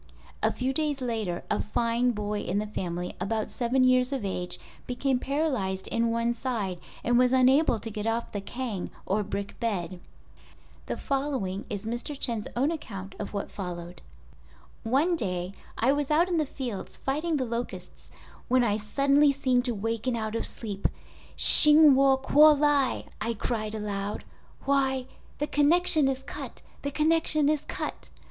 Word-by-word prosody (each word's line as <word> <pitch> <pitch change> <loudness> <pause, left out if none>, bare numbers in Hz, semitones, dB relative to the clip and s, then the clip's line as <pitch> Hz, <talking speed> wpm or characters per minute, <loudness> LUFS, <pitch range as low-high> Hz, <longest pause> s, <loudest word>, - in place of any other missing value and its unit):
A - - +2
few 260 +1 -2
days 295 -1 -1
later 220 -8 -3
a 210 - +1
fine 235 +3 0
boy 210 -2 -2
in 190 0 -2
the 210 - -1
family, 180 -4 -4
about 215 +3 -2
seven 255 +2 +1
years 255 0 +3
of 265 -7 -3
age, 180 -2 -4 0.3
became 250 +1 0
paralyzed 260 -10 -2
in 230 0 +1
one 230 +1 0
side 220 -7 -3 0.2
and 240 0 +3
was 250 0 +4
unable 260 +1 +4
to 225 +1 -6
get 210 +1 -4
off 230 +1 -2
the 205 - -4
kang 230 -3 -5 0.2
(or 205 +3 0
brick 200 0 -5
bed). 185 -6 -3 0.9
The - - -3
following 265 -9 -2
is 205 0 -5
Mr. 240 +5 -4
Chen's 230 -4 -2
own 270 +6 +1
account 195 - -7
of - - -5
what 200 -1 -4
followed. 175 -2 -7 0.8
"One 280 +10 +2
day 180 - -3 0.2
I 245 +4 +3
was 290 -1 -2
out 320 +4 +3
in 345 -2 +1
the 305 - 0
fields 245 -8 -6
fighting 305 +4 -1
the 260 - -1
locusts 235 +1 -6 0.4
when 255 0 +3
I 210 -3 +1
suddenly 280 +7 +3
seemed 255 -2 +1
to 240 -3 -1
waken 225 +4 -2
out 220 -1 -3
of 230 - -2
sleep. 205 -4 -3 0.5
"Hsing 300 -1 +9
Wu 270 0 +4
kuo 295 +3 +6
lai" 285 -2 +2 0.2
I 230 0 -1
cried 215 0 -3
aloud—'Why! 235 +6 -3 0.3
_the 295 - -2
connection 310 0 +4
is 265 0 -2
cut! - - -8 0.2
The 280 - -2
connection 310 0 +2
is 305 -2 +1
cut! - - -5
240 Hz, 160 wpm, -27 LUFS, 210-275 Hz, 0.9 s, Hsing